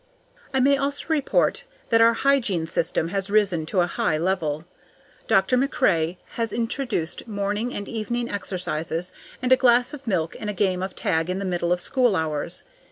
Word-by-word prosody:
I 265 - +1
may 280 +2 +4
also 280 0 -2
report 300 -4 +1 0.3
that 230 0 +4
our 230 0 +6
hygiene 230 -12 +2
system 165 0 0
has 195 +1 -2
risen 195 -7 +2
to 185 +1 +2
a - - +3
high 160 -2 0
level. 160 -3 -1 0.6
Dr. 195 +6 +3
MacRae 180 - +1 0.2
has 230 -1 -1
introduced 235 - -2
morning 205 +3 -2
and 205 - -5
evening 235 +2 -2
exercises, 180 -3 -3 0.3
and 250 - 0
a - - +10
glass 245 +1 +4
of 280 -3 -9
milk 170 -6 0
and 210 - -4
a - - -2
game 185 -2 0
of 190 - -4
tag 160 0 0
in 185 - -1
the 200 - -3
middle 175 -2 -1
of 180 - +2
school 245 +2 +2
hours. 160 0 -2
200 Hz, 175 wpm, -24 LUFS, 175-240 Hz, 0.6 s, a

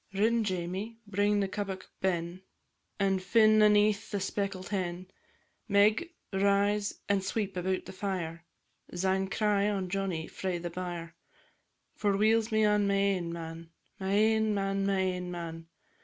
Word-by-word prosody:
Rin, 225 +3 +3
Jamie, 190 +3 -3
bring 205 0 +1
the 195 - 0
kebbuck 195 -1 -4 0.2
ben, 175 -1 -1 0.6
And 195 -1 +2
fin' 215 +2 +5
aneath 210 0 +4
the 205 - -2
speckled 195 -1 -3
hen; 185 -2 -3 0.6
Meg, 215 - +3 0.2
rise 200 +1 +1
and 200 -1 +1
sweep 200 0 -2
about 185 +1 -1
the 190 - -9
fire, 180 -4 -4 0.5
Syne 190 +2 0
cry 205 0 +2
on 195 -3 -2
Johnnie 185 -4 -2
frae 185 0 -3
the 175 0 -5
byre. 175 -2 -5 0.8
For 200 -2 0
weel's 220 +2 +3
me 220 0 +3
on 210 -1 +3
my 200 - +2
ain 195 -4 +1
man, 165 0 -7 0.3
My 190 0 -2
ain 220 0 +3
man, 195 0 0
my 195 -1 +1
ain 180 -1 -2
man! 165 -2 -6
195 Hz, 145 wpm, -30 LUFS, 185-205 Hz, 0.8 s, fin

